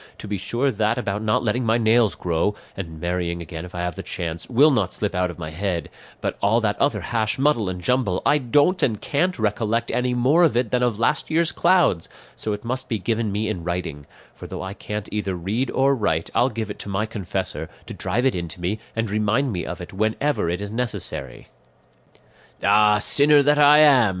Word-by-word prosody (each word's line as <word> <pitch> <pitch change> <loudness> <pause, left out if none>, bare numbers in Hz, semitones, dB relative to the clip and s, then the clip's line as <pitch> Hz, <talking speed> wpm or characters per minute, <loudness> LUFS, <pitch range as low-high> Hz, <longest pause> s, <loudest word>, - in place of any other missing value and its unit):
To - - -9
be 100 -1 -3
sure 125 +8 0
that 110 +1 0
about 105 -4 -2
not 110 +1 +1
letting 120 +3 0
my 115 0 +2
nails 115 -2 +3
grow, 90 +4 -1 0.2
and 80 -4 -7
marrying 85 0 -2
again 85 0 -7
if 90 - -12
I 85 - -3
have 90 -1 -2
the - - -5
chance, 85 -1 -5
will 140 +5 +5
not 105 -9 +1
slip 105 -2 -2
out 90 -1 0
of 85 - -8
my 80 -2 -6
head; 85 -1 -3 0.3
but - - -3
all 105 +4 +3
that 105 -2 0
other 140 - +1
hash, 110 -2 -1
muddle, 135 -8 +2
and 90 -1 -5
jumble 105 -2 0
I 150 +1 +4
don't 145 +8 +2
and 110 -5 +1
can't 180 +6 0
recollect 110 +2 -1
any 125 0 0
more 135 +8 +4
of 150 -8 +3
it 120 -3 0
than 125 - +1
of 120 -4 +1
last 135 +7 0
year's 165 +1 +2
clouds; 170 - +2 0.3
so 110 - -3
it 105 +2 -5
must 130 +2 -3
be 115 - 0
given 110 +1 -1
me 105 +2 -1
in 100 -6 -3
writing; 80 -5 -4 0.3
for - - -10
though - - -6
I 95 +1 -5
can't 105 0 -6
either 105 -3 -2
read 105 +10 -2
or 135 +1 +2
write, 80 -10 -1
I'll 125 +2 +3
give 110 -3 -4
it - - -9
to - - -7
my 100 +2 -1
confessor, 105 -5 -4 0.2
to - - -8
drive 125 +3 -1
it 135 - +3
into 85 -1 -5
me 95 +5 -2 0.2
and 115 0 -1
remind 110 +6 0
me 90 - -4
of - - -6
it 90 - -9
whenever 110 - 0
it 90 +3 -2
is 105 0 -5
necessary." 115 - -4 1.1
"Ah, 105 +1 +5
sinner 145 +6 +5
that 145 +1 +3
I 150 +1 +7
am!" 135 -8 +6
110 Hz, 220 wpm, -22 LUFS, 95-125 Hz, 1.1 s, I